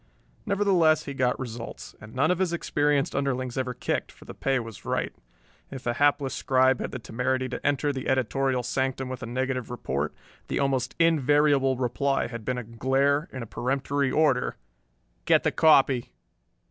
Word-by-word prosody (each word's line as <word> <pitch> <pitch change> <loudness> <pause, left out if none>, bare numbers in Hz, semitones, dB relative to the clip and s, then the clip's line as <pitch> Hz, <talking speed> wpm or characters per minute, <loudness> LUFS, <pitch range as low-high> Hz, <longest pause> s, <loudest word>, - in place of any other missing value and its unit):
Nevertheless 180 -6 +3
he 140 - -5
got 125 -2 0
results, 120 -2 -7
and 110 +2 -12
none 150 +6 +3
of 180 - 0
his 185 -3 +1
experienced 145 -4 0
underlings 130 -3 -1
ever 130 -1 -2
kicked, 125 - -2
for - - -17
the - - -8
pay 135 -1 0
was 115 -4 -7
right. - - -2 0.6
If 135 -2 -8
a 120 - +1
hapless 145 0 +2
scribe 130 0 +2
had - - -3
the - - -5
temerity 130 +2 -1
to - - -6
enter 145 0 +1
the 130 -1 -5
editorial 130 0 +1
sanctum 130 +1 -2
with 130 -1 -6
a - - -5
negative 130 0 -2
report, 75 - -3 0.3
the - - -2
almost 130 -2 0
invariable 145 -4 +3
reply 135 +2 0
had 115 -2 -7
been 125 +3 -2
a 125 - -3
glare 135 +6 +1
and 130 -2 -5
a - - -6
peremptory 135 +4 -1
order, 145 -5 +2 0.7
"Get - - +4
the - - +2
copy." 135 -6 +4
130 Hz, 170 wpm, -26 LUFS, 125-140 Hz, 0.7 s, Get